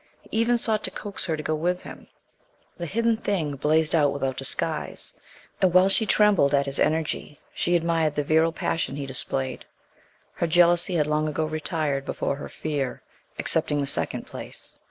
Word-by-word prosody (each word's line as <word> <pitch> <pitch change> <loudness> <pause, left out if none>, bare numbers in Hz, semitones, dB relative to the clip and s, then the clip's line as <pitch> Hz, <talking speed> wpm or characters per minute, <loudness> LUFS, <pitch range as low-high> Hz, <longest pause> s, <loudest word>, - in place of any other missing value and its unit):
He - - -20
even 240 +1 +3
sought 220 -2 0
to - - -2
coax 205 -2 -4
her 160 -3 -1
to 150 - -6
go 155 - -1
with 175 +4 -1
him. - - -11 0.7
The 170 - -3
hidden 230 +4 +1
thing 170 -10 -1
blazed 155 +3 +2
out 145 -4 +4
without 135 -2 -2
disguise. 135 - -1 0.5
And, 185 -2 +3
while 185 +1 +6
she 215 +3 +1
trembled 200 -11 +4
at 140 0 +2
his 140 0 -3
energy, 155 -1 -1
she 175 - 0
admired 165 -3 +1
the 145 - 0
virile 160 +3 +3
passion 165 -3 -2
he 140 -1 -4
displayed. 130 0 -3 0.7
Her 170 - -1
jealousy 175 +1 +4
had 150 -3 +2
long 150 +1 0
ago 155 +1 -1
retired 155 -2 -2
before 140 - -2
her 145 - -7
fear, 145 -4 -3 0.3
accepting 150 - +2
the 140 - 0
second - - -1
place. - - -9
155 Hz, 175 wpm, -25 LUFS, 145-175 Hz, 0.7 s, while